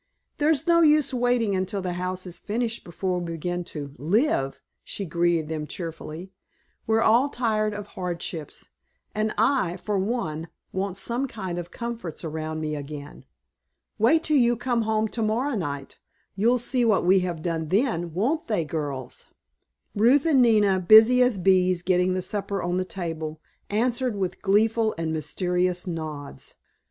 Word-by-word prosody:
"There's 305 Hz, +1 st, +2 dB
no 340 Hz, -1 st, +5 dB
use 300 Hz, -3 st, +4 dB
waiting 245 Hz, -4 st, +1 dB
until 190 Hz, +2 st, -2 dB
the 180 Hz, -1 st, -2 dB
house 185 Hz, +1 st, -3 dB
is 180 Hz, -2 st, -7 dB
finished 230 Hz, +2 st, -3 dB
before 180 Hz, +1 st, -2 dB
we 170 Hz, -1 st, -4 dB
begin 175 Hz, +2 st, -3 dB
to 145 Hz, -4 st, -7 dB
live," 160 Hz, -, +1 dB, 0.2 s
she 200 Hz, -, -5 dB
greeted 170 Hz, -1 st, +1 dB
them 155 Hz, -1 st, -4 dB
cheerily; 165 Hz, +1 st, -7 dB, 0.6 s
"we're 225 Hz, 0 st, +3 dB
all 240 Hz, +6 st, +4 dB
tired 215 Hz, -4 st, 0 dB
of 205 Hz, -1 st, -5 dB
hardships, 175 Hz, -5 st, -6 dB, 0.4 s
and 215 Hz, 0 st, 0 dB
I, 215 Hz, -6 st, +2 dB
for 205 Hz, +1 st, -2 dB
one, 170 Hz, -7 st, -2 dB, 0.3 s
want 190 Hz, 0 st, -2 dB
some 240 Hz, +7 st, -2 dB
kind 185 Hz, -7 st, -5 dB
of 175 Hz, 0 st, -7 dB
comforts 230 Hz, -10 st, -6 dB
around 155 Hz, 0 st, -4 dB
me 155 Hz, -1 st, -2 dB
again. 145 Hz, 0 st, -8 dB, 0.7 s
Wait 310 Hz, +9 st, +4 dB
till 305 Hz, -2 st, +3 dB
you 240 Hz, -2 st, +4 dB
come 245 Hz, -1 st, 0 dB
home 220 Hz, 0 st, +1 dB
to 230 Hz, -, -3 dB
morrow 235 Hz, +6 st, 0 dB
night, 145 Hz, -7 st, -5 dB, 0.4 s
you'll 230 Hz, +6 st, +3 dB
see 245 Hz, +1 st, 0 dB
what 215 Hz, -6 st, +3 dB
we 190 Hz, +2 st, +5 dB
have 175 Hz, -3 st, -3 dB
done 165 Hz, -2 st, -2 dB
then, 190 Hz, -, +1 dB
won't 250 Hz, -, -1 dB
they, 205 Hz, -8 st, 0 dB
girls?" 145 Hz, -5 st, -5 dB, 0.7 s
Ruth 250 Hz, +8 st, +4 dB
and 290 Hz, -5 st, +5 dB
Nina, 210 Hz, -5 st, +4 dB
busy 220 Hz, +7 st, +7 dB
as 250 Hz, -4 st, +3 dB
bees 185 Hz, -1 st, +3 dB
getting 180 Hz, 0 st, +2 dB
the 185 Hz, -, -2 dB
supper 200 Hz, 0 st, -3 dB
on 175 Hz, +1 st, -1 dB
the 185 Hz, -, 0 dB
table, 160 Hz, -4 st, -5 dB, 0.3 s
answered 240 Hz, +2 st, 0 dB
with 190 Hz, -2 st, -3 dB
gleeful 220 Hz, +2 st, +2 dB
and 165 Hz, -1 st, -2 dB
mysterious 180 Hz, +3 st, -1 dB
nods. 155 Hz, -5 st, -6 dB
190 Hz, 160 wpm, -25 LUFS, 170-230 Hz, 0.7 s, busy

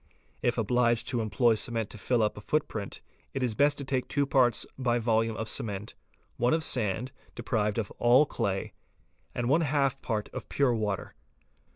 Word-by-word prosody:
If 120 Hz, 0 st, +1 dB
obliged 120 Hz, 0 st, +2 dB
to 120 Hz, -3 st, 0 dB
employ 115 Hz, +2 st, +3 dB
cement 115 Hz, -1 st, -2 dB
to -, -, -7 dB
fill 120 Hz, +3 st, +1 dB
up 105 Hz, -, 0 dB
a 105 Hz, -, -9 dB
footprint, 110 Hz, -6 st, -2 dB, 0.3 s
it 135 Hz, -, -1 dB
is 120 Hz, -3 st, 0 dB
best 145 Hz, +4 st, +3 dB
to 140 Hz, -, -4 dB
take 130 Hz, -2 st, -1 dB
2 145 Hz, 0 st, +1 dB
parts 130 Hz, -4 st, +3 dB
by 120 Hz, -2 st, +1 dB
volume 115 Hz, -1 st, +1 dB
of 110 Hz, -, -3 dB
cement, 105 Hz, -1 st, -3 dB, 0.4 s
one 120 Hz, +6 st, +3 dB
of 160 Hz, -, -1 dB
sand 120 Hz, -1 st, 0 dB, 0.2 s
(deprived 110 Hz, -3 st, -1 dB
of 110 Hz, -4 st, -2 dB
all 125 Hz, +5 st, +6 dB
clay), 100 Hz, -8 st, -2 dB, 0.6 s
and 120 Hz, -1 st, -1 dB
one 150 Hz, +6 st, +4 dB
half 140 Hz, -3 st, +1 dB
part 110 Hz, -3 st, -2 dB
of -, -, -8 dB
pure 140 Hz, -4 st, +2 dB
water. 105 Hz, -4 st, -2 dB
120 Hz, 180 wpm, -29 LUFS, 110-130 Hz, 0.6 s, all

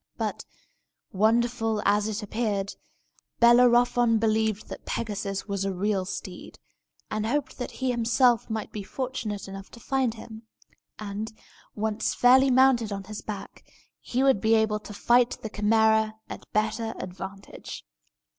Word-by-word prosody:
But, -, -, -3 dB, 0.7 s
wonderful 225 Hz, +2 st, +2 dB
as 205 Hz, +1 st, +3 dB
it 215 Hz, 0 st, -3 dB
appeared, 205 Hz, -2 st, -2 dB, 0.7 s
Bellerophon 240 Hz, -1 st, +5 dB
believed 220 Hz, -1 st, 0 dB
that -, -, -8 dB
Pegasus 205 Hz, -3 st, -3 dB
was 200 Hz, -1 st, -2 dB
a 195 Hz, -, -1 dB
real 190 Hz, 0 st, -1 dB
steed, 185 Hz, -1 st, -7 dB, 0.5 s
and 215 Hz, 0 st, -1 dB
hoped 270 Hz, +2 st, -2 dB
that 250 Hz, -, -3 dB
he 260 Hz, -1 st, -2 dB
himself 240 Hz, 0 st, +2 dB
might 220 Hz, -1 st, -4 dB
be 210 Hz, -, -5 dB
fortunate 220 Hz, -2 st, -4 dB
enough 195 Hz, 0 st, -9 dB
to 235 Hz, -, -13 dB
find 260 Hz, -1 st, 0 dB
him; 220 Hz, 0 st, -11 dB, 0.5 s
and, 210 Hz, +1 st, -5 dB, 0.4 s
once 215 Hz, 0 st, -1 dB
fairly 260 Hz, +2 st, +6 dB
mounted 255 Hz, -4 st, +4 dB
on 195 Hz, -1 st, -4 dB
his 210 Hz, +1 st, -7 dB
back, 205 Hz, -2 st, -8 dB, 0.4 s
he 255 Hz, +2 st, -1 dB
would 265 Hz, -7 st, +3 dB
be 220 Hz, +1 st, +4 dB
able 220 Hz, -1 st, +2 dB
to 210 Hz, -, -10 dB
fight 240 Hz, +4 st, +3 dB
the 220 Hz, -, -5 dB
Chimæra 220 Hz, +1 st, +3 dB, 0.2 s
at -, -, -9 dB
better 220 Hz, +1 st, -1 dB
advantage. 190 Hz, +2 st, -8 dB
220 Hz, 140 wpm, -26 LUFS, 205-240 Hz, 0.7 s, fairly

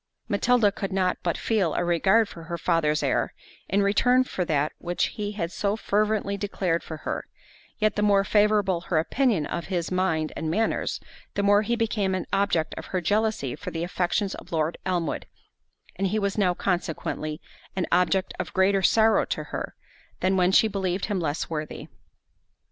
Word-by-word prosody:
Matilda 220 Hz, +1 st, +3 dB
could 195 Hz, 0 st, -4 dB
not 185 Hz, -1 st, +1 dB
but 170 Hz, -, -1 dB
feel 200 Hz, -8 st, 0 dB
a -, -, +1 dB
regard 190 Hz, +6 st, +3 dB
for 165 Hz, -3 st, -11 dB
her 170 Hz, 0 st, -4 dB
father's 160 Hz, -3 st, +1 dB
heir, -, -, 0 dB, 0.3 s
in 200 Hz, +2 st, +2 dB
return 250 Hz, +6 st, +4 dB
for 190 Hz, -7 st, -3 dB
that 150 Hz, -2 st, +1 dB
which 175 Hz, 0 st, -1 dB
he 210 Hz, -2 st, -4 dB
had 170 Hz, -5 st, -3 dB
so 200 Hz, +1 st, 0 dB
fervently 210 Hz, -1 st, 0 dB
declared 190 Hz, -4 st, -1 dB
for 160 Hz, -, -7 dB
her; -, -, -3 dB, 0.5 s
yet 215 Hz, 0 st, +1 dB
the 210 Hz, -, 0 dB
more 200 Hz, -1 st, +4 dB
favourable 205 Hz, -3 st, +2 dB
her 175 Hz, -2 st, -1 dB
opinion 205 Hz, -, +1 dB
of 170 Hz, +2 st, -4 dB
his 175 Hz, -3 st, -2 dB
mind 165 Hz, -4 st, 0 dB
and 160 Hz, -, -3 dB
manners, 220 Hz, +7 st, 0 dB, 0.4 s
the 200 Hz, -, 0 dB
more 205 Hz, +1 st, +5 dB
he 235 Hz, +3 st, 0 dB
became 215 Hz, -4 st, 0 dB
an 185 Hz, -, -3 dB
object 185 Hz, -5 st, +1 dB
of -, -, -9 dB
her 185 Hz, -, -1 dB
jealousy 210 Hz, -, 0 dB
for 145 Hz, -, -6 dB
the 165 Hz, 0 st, -3 dB
affections 180 Hz, +3 st, -1 dB
of -, -, -10 dB
Lord 160 Hz, 0 st, -1 dB
Elmwood, 175 Hz, -4 st, -1 dB, 0.7 s
and 195 Hz, +1 st, +1 dB
he 210 Hz, +4 st, 0 dB
was 200 Hz, -2 st, 0 dB
now 185 Hz, -4 st, +2 dB
consequently, 160 Hz, -4 st, -2 dB, 0.4 s
an 185 Hz, -, 0 dB
object 180 Hz, +1 st, +2 dB
of -, -, -4 dB
greater 190 Hz, +1 st, +3 dB
sorrow 220 Hz, +4 st, +4 dB
to -, -, -3 dB
her, -, -, -4 dB, 0.4 s
than 190 Hz, +1 st, +2 dB
when 180 Hz, 0 st, +3 dB
she 220 Hz, -, +5 dB
believed 190 Hz, -2 st, -1 dB
him 205 Hz, -3 st, -1 dB
less 155 Hz, -2 st, -2 dB
worthy. 155 Hz, -2 st, -5 dB
190 Hz, 180 wpm, -26 LUFS, 170-205 Hz, 0.7 s, more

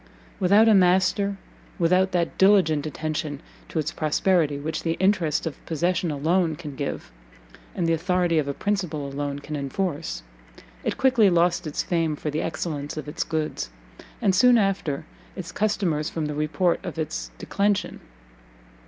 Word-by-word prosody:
Without 200 Hz, +4 st, +5 dB
a 220 Hz, -, +7 dB
master, 190 Hz, +1 st, +3 dB, 0.4 s
without 185 Hz, +2 st, +3 dB
that 175 Hz, -2 st, 0 dB
diligent 180 Hz, -7 st, +4 dB
attention 155 Hz, -2 st, -3 dB, 0.3 s
to -, -, -5 dB
its 155 Hz, 0 st, 0 dB
prosperity 155 Hz, -1 st, +1 dB
which 155 Hz, +2 st, -3 dB
the 165 Hz, -, 0 dB
interest 180 Hz, -6 st, +2 dB
of 160 Hz, -, -6 dB
possession 175 Hz, +2 st, 0 dB
alone 160 Hz, +3 st, +1 dB
can 150 Hz, -3 st, -8 dB
give, 135 Hz, -, -4 dB, 0.6 s
and 175 Hz, -, 0 dB
the 165 Hz, -, +2 dB
authority 175 Hz, 0 st, +1 dB
of 145 Hz, -, -1 dB
a 140 Hz, -, -1 dB
principal 180 Hz, -8 st, -2 dB
alone 140 Hz, 0 st, -3 dB
can 150 Hz, +1 st, -6 dB
enforce, 140 Hz, -, -3 dB, 0.6 s
it -, -, -2 dB
quickly 250 Hz, -6 st, +4 dB
lost 175 Hz, 0 st, +2 dB
its 150 Hz, -, -2 dB
fame 165 Hz, -3 st, 0 dB
for 150 Hz, +1 st, -4 dB
the 150 Hz, -, -1 dB
excellence 155 Hz, -3 st, -4 dB
of 150 Hz, -, -5 dB
its 150 Hz, +3 st, -2 dB
goods, 160 Hz, -1 st, -3 dB, 0.5 s
and 195 Hz, -3 st, +4 dB
soon 245 Hz, +6 st, +6 dB
after 195 Hz, -9 st, 0 dB, 0.3 s
its 180 Hz, -3 st, -6 dB
customers 185 Hz, -8 st, 0 dB
from 160 Hz, -2 st, -3 dB
the 150 Hz, -, -3 dB
report 155 Hz, +4 st, 0 dB
of 175 Hz, -4 st, -6 dB
its 160 Hz, 0 st, -3 dB
declension. 200 Hz, 0 st, -1 dB
165 Hz, 155 wpm, -25 LUFS, 150-190 Hz, 0.6 s, a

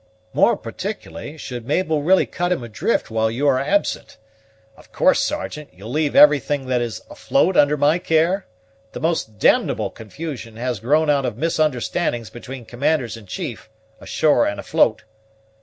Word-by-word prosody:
"More -, -, +4 dB
particularly, 85 Hz, -, -7 dB
should 125 Hz, -5 st, -7 dB
Mabel 155 Hz, 0 st, +1 dB
really 185 Hz, +6 st, +4 dB
cut 175 Hz, 0 st, -2 dB
him 170 Hz, -9 st, 0 dB
adrift 110 Hz, 0 st, -1 dB
while 110 Hz, 0 st, +1 dB
you 130 Hz, +6 st, -1 dB
are 130 Hz, -2 st, +3 dB
absent. 195 Hz, +9 st, -1 dB, 0.6 s
Of -, -, -20 dB
course, -, -, +3 dB
Sergeant, 145 Hz, +10 st, -3 dB
you'll 100 Hz, +5 st, -10 dB
leave 150 Hz, +1 st, 0 dB
everything 145 Hz, -1 st, +5 dB
that 125 Hz, -1 st, +1 dB
is 120 Hz, -2 st, -4 dB
afloat 190 Hz, -9 st, +1 dB
under 145 Hz, +1 st, +4 dB
my 150 Hz, +4 st, +3 dB
care? 170 Hz, +4 st, +1 dB, 0.5 s
The -, -, -6 dB
most 160 Hz, -10 st, -1 dB
d -, -, +4 dB
ble -, -, -3 dB
confusion 115 Hz, 0 st, -8 dB
has 120 Hz, -1 st, -3 dB
grown 150 Hz, +7 st, +2 dB
out 140 Hz, -2 st, +1 dB
of 115 Hz, -, -5 dB
misunderstandings 150 Hz, -5 st, -1 dB
between 120 Hz, +1 st, -9 dB
commanders 125 Hz, 0 st, -1 dB
in 110 Hz, -3 st, -13 dB
chief, 130 Hz, -, -6 dB, 0.3 s
ashore 150 Hz, -6 st, +2 dB
and 100 Hz, -, -3 dB
afloat." -, -, +1 dB
140 Hz, 155 wpm, -21 LUFS, 115-155 Hz, 0.6 s, everything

